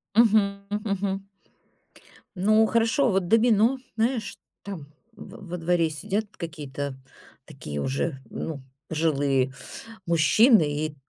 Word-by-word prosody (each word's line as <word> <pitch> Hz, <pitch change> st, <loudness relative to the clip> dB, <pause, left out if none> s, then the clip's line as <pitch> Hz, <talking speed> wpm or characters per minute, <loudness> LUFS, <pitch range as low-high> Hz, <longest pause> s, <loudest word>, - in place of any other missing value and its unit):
Мгм. 205 Hz, -3 st, +4 dB
Мгм. 210 Hz, +1 st, -2 dB
Мгм. 195 Hz, 0 st, -2 dB, 1.1 s
Ну, 215 Hz, +4 st, +4 dB
хорошо, 230 Hz, +3 st, +2 dB
вот 190 Hz, -2 st, 0 dB
домино, 225 Hz, +3 st, +4 dB, 0.2 s
знаешь, 225 Hz, -1 st, -1 dB, 0.3 s
там 185 Hz, -8 st, -7 dB, 0.3 s
в 205 Hz, -2 st, -12 dB
во 180 Hz, -, -4 dB
дворе 165 Hz, -1 st, +1 dB
сидят 205 Hz, +7 st, -2 dB
какие-то 145 Hz, -5 st, -5 dB, 0.5 s
такие 75 Hz, -1 st, -7 dB
уже, 135 Hz, -, -2 dB
ну, 145 Hz, -5 st, -5 dB, 0.3 s
пожилые 140 Hz, -5 st, +1 dB, 0.5 s
мужчины 170 Hz, -, +5 dB, 0.2 s
и 155 Hz, -, -6 dB
195 Hz, 110 wpm, -25 LUFS, 155-220 Hz, 1.1 s, мужчины